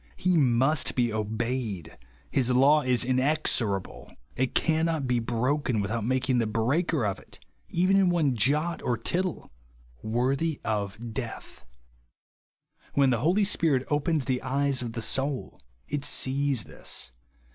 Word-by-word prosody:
He 185 Hz, 0 st, +1 dB
must 135 Hz, +1 st, +2 dB
be 120 Hz, -3 st, +1 dB
obeyed; 110 Hz, -4 st, -3 dB, 0.4 s
his 130 Hz, -3 st, +2 dB
law 140 Hz, +4 st, +5 dB
is 125 Hz, -2 st, +2 dB
inexorable; 130 Hz, -, -1 dB, 0.2 s
it 130 Hz, 0 st, -1 dB
cannot 160 Hz, -2 st, +1 dB
be 125 Hz, -1 st, +1 dB
broken 125 Hz, +2 st, 0 dB
^v'ithout 110 Hz, +3 st, -2 dB
making 130 Hz, +1 st, +1 dB
the 115 Hz, -, 0 dB
breaker 125 Hz, +6 st, 0 dB
of 100 Hz, -2 st, -2 dB
it -, -, -15 dB, 0.3 s
(even 185 Hz, +3 st, +2 dB
in 195 Hz, -2 st, +4 dB
one 155 Hz, -7 st, +1 dB
jot 150 Hz, +9 st, +1 dB
or 120 Hz, -, -1 dB
tittle) 180 Hz, +5 st, -2 dB, 0.5 s
worthy 135 Hz, +7 st, 0 dB
of 110 Hz, +2 st, -3 dB
death. 120 Hz, -3 st, -7 dB, 1.3 s
When 140 Hz, -2 st, +4 dB
the 120 Hz, -, +1 dB
Holy 175 Hz, -, +2 dB
Spirit 160 Hz, -9 st, +1 dB
opens 145 Hz, -1 st, +1 dB
the 130 Hz, -2 st, -1 dB
eyes 140 Hz, -1 st, 0 dB
of 120 Hz, -2 st, -5 dB
the 115 Hz, -1 st, -3 dB
soul 135 Hz, +2 st, -2 dB, 0.3 s
it 145 Hz, -1 st, -3 dB
sees 135 Hz, -4 st, +1 dB
this. 65 Hz, -, -4 dB
130 Hz, 135 wpm, -27 LUFS, 115-150 Hz, 1.3 s, law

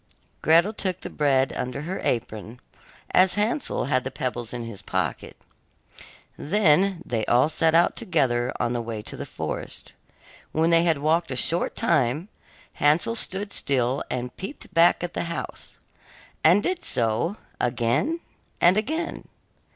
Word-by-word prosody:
Gretel 170 Hz, +7 st, +4 dB
took 185 Hz, -3 st, -3 dB
the -, -, -7 dB
bread 135 Hz, -3 st, +2 dB
under 125 Hz, +3 st, -4 dB
her 180 Hz, +4 st, -4 dB
apron, 110 Hz, 0 st, -3 dB, 0.5 s
as 185 Hz, 0 st, +4 dB
Hansel 220 Hz, +7 st, 0 dB
had 130 Hz, -1 st, +1 dB
the 130 Hz, -, -3 dB
pebbles 120 Hz, -3 st, -4 dB
in 120 Hz, -1 st, -5 dB
his 115 Hz, -4 st, -7 dB
pocket. -, -, -3 dB, 1.0 s
Then 185 Hz, 0 st, +3 dB
they 115 Hz, -3 st, -1 dB
all 125 Hz, +5 st, +4 dB
set 160 Hz, +1 st, +2 dB
out 170 Hz, +1 st, +4 dB
together 125 Hz, -8 st, +1 dB
on 120 Hz, -, 0 dB
the 120 Hz, -, -1 dB
way 115 Hz, -2 st, -5 dB
to -, -, -6 dB
the -, -, -6 dB
forest. -, -, -4 dB, 0.6 s
When 160 Hz, +2 st, +2 dB
they 165 Hz, 0 st, +5 dB
had 165 Hz, -3 st, +3 dB
walked 160 Hz, +4 st, +1 dB
a 130 Hz, -, -3 dB
short 165 Hz, +7 st, 0 dB
time, 150 Hz, -, +1 dB, 0.4 s
Hansel 155 Hz, +10 st, +2 dB
stood 200 Hz, -2 st, -3 dB
still 130 Hz, -1 st, 0 dB
and 125 Hz, 0 st, -4 dB
peeped 195 Hz, +10 st, -7 dB
back 170 Hz, +2 st, +5 dB
at 175 Hz, -, -4 dB
the -, -, -2 dB
house, 170 Hz, 0 st, -6 dB, 0.7 s
and 180 Hz, +6 st, +6 dB
did 365 Hz, -1 st, -1 dB
so 120 Hz, -, 0 dB, 0.2 s
again 120 Hz, -, 0 dB, 0.4 s
and 180 Hz, +3 st, +5 dB
again. 315 Hz, +10 st, -2 dB
155 Hz, 150 wpm, -25 LUFS, 125-185 Hz, 1.0 s, and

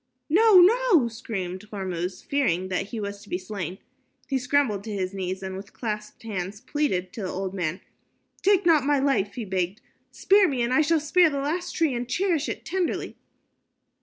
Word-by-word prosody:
"No, 420 Hz, +2 st, +7 dB
no," 400 Hz, -, +5 dB
screamed 205 Hz, -4 st, -5 dB
Hormuz, 185 Hz, -3 st, -4 dB
fearing 185 Hz, -11 st, 0 dB
that 190 Hz, +1 st, -1 dB
he 230 Hz, +1 st, -5 dB
was 200 Hz, -1 st, -5 dB
to 205 Hz, -, -15 dB
be 180 Hz, -, -1 dB
slain. 185 Hz, -2 st, -5 dB, 0.5 s
He 270 Hz, -2 st, 0 dB
scrambled 250 Hz, -6 st, +1 dB
to 220 Hz, -, -5 dB
his 190 Hz, -2 st, -2 dB
knees 190 Hz, 0 st, -4 dB
and 190 Hz, 0 st, -5 dB
with 195 Hz, +2 st, -9 dB
clasped 210 Hz, -2 st, -5 dB
hands 200 Hz, -2 st, -4 dB
pleaded 255 Hz, -9 st, -1 dB
to 225 Hz, -, -6 dB
the 185 Hz, -, -3 dB
old 190 Hz, 0 st, -4 dB
man. 180 Hz, -1 st, -2 dB, 0.6 s
"Take 395 Hz, -2 st, +3 dB
not 320 Hz, -5 st, +5 dB
my 290 Hz, +1 st, +2 dB
life," 265 Hz, -8 st, +1 dB
he 235 Hz, -, -4 dB
begged. 185 Hz, +1 st, -2 dB, 0.3 s
"Spare 395 Hz, 0 st, +4 dB
me, 260 Hz, -6 st, 0 dB
and 240 Hz, +2 st, 0 dB
I 310 Hz, -, +5 dB
shall 320 Hz, +1 st, +3 dB
spare 325 Hz, +3 st, +4 dB
the 285 Hz, -, -3 dB
last 315 Hz, +6 st, -2 dB
tree 320 Hz, -5 st, +2 dB
and 240 Hz, 0 st, -4 dB
cherish 330 Hz, 0 st, 0 dB
it -, -, -5 dB
tenderly." 365 Hz, 0 st, -2 dB
225 Hz, 190 wpm, -25 LUFS, 190-300 Hz, 0.6 s, No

